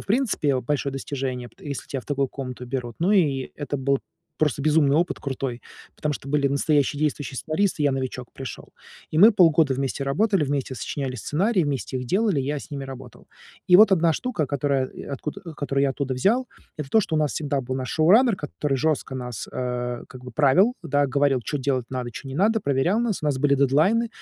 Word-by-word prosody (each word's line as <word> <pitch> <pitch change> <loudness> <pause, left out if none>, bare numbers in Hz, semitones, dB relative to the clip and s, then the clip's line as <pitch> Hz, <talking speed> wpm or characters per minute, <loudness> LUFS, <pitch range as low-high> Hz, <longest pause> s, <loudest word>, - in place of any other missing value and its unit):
в - - -12
принципе, 210 - +1
о, 130 - 0
большое 140 +1 -2
достижение, 130 -3 -4
пт 195 - -26
если 140 -4 -6
тебя 135 - -3
в - - -19
такую 140 -2 0
комнату 125 -2 -7
берут. 120 -2 -4
Ну 180 +4 +2
и 145 -10 +2
это 145 -1 -3
был 135 0 +1 0.4
просто 145 -2 +1
безумный 150 -2 +3
опыт 170 +3 +1
крутой, 130 -3 -4 0.4
потому 150 -1 -1
что 140 - -7
были 145 -1 +2
настоящие 145 +1 +1
действующие 145 -3 -2
сценаристы, 160 +1 0
и - - +2
я - - +3
новичок 130 -2 -4
пришёл. 130 -5 -8 0.4
И 155 - -1
мы 215 +6 +8
полгода 160 -7 +4
вместе 135 +1 -2
работали, 190 +4 +2
вместе 135 -2 -2
сочиняли 130 +2 -4
сценарии, 180 - +1
вместе 140 -2 -3
их 125 -1 -4
делали, 195 - +1
я 140 +2 -2
с - - -12
ними 140 -1 -5
работал. 130 -2 -11 0.4
И 180 - +5
вот 215 +2 +8
одна 170 -3 +4
штука, 180 - -2
которая, 140 -1 0
и - - -11
откуда, 150 +6 -6
э, 165 - -8
которую 140 -2 -1
я 140 - +3
оттуда 135 -1 -3
взял. 225 - +2 0.3
Это 150 -3 -5
то, 220 - +4
что 160 -6 -2
у - - +2
нас 150 -2 +1
всегда 145 -2 -1
был 130 0 -4
наш 130 -1 -3
шоураннер 205 +8 +4
который 145 -3 -2
жестко 140 -1 -1
нас, 125 -4 -6
э, 125 -1 -3
как 130 - -12
бы 125 - -8
правил, 150 - +4
да. 145 -2 +2
Говорил, 140 -1 +2
чё 145 - -3
делать 130 -2 -1
надо, 125 -2 -4
чё 135 - -8
не 135 - -6
надо, 220 +5 +2
проверял 145 - +1
нас. 220 -9 -1
У - - +1
нас 140 -3 0
были 140 -1 +3
дедлайны, 155 - +3
140 Hz, 215 wpm, -24 LUFS, 130-160 Hz, 0.4 s, мы